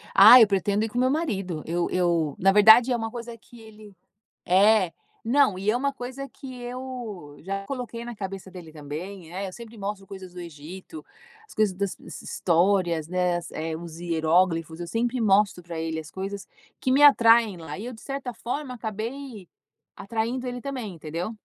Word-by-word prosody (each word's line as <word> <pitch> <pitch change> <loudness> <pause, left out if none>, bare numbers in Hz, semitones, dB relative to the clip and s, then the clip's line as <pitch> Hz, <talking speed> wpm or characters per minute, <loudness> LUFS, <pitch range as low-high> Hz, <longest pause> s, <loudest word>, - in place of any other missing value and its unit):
Ah, 250 - +11
eu 225 - +7
pretendo 200 +2 +1
ir - - -5
com 240 - -7
o - - +3
meu 255 - +3
marido. 195 - -2
Eu 170 +1 -1
eu, 170 -5 +1
na 195 +1 +5
verdade 220 +5 +7
é - - +3
uma 225 -1 -3
coisa 235 0 -7
que 235 +1 -17
ele 215 -2 -14 0.5
É, 190 0 +4 0.3
não, 255 -4 +3
e 200 +2 +1
é 225 - +1
uma 280 +3 0
coisa 265 +1 -7
que 265 -2 -10
eu 240 - -7
já 195 +3 -4
coloquei 240 -2 -5
na 240 0 -6
cabeça 195 -2 -6
dele 175 -4 -11
também, 160 +4 -8
é, 195 +1 -3
eu 185 - -9
sempre 230 +1 -11
mostro 195 -1 -5
coisas 190 -2 -10
do 180 - -7
Egito, 170 - -10 0.4
as - - -16
coisas 210 -4 +1
das 200 0 -3
s - - -10
histórias, 170 -2 +1
né, 180 -1 +1
as 170 -1 -6 0.3
os 165 -1 -9
hieróglifos, 165 0 +1
eu 175 - -4
sempre 240 +6 -1
mostro 200 -3 +3
pra 170 -1 -6
ele 160 0 -3
as 155 0 -12
coisas 195 +1 -5 0.3
que 255 - +1
me 280 +2 +4
atraem 230 -7 +6
lá, 160 -3 -7
e 215 - -6
eu 250 - -5
de 220 - -12
certa 275 -2 -5
forma 255 +2 -4
acabei 225 -1 -6 0.5
atraindo 230 +4 -3
ele 245 0 -4
também, 250 -7 -5
entendeu? 165 +5 -5
200 Hz, 190 wpm, -25 LUFS, 175-240 Hz, 0.5 s, Ah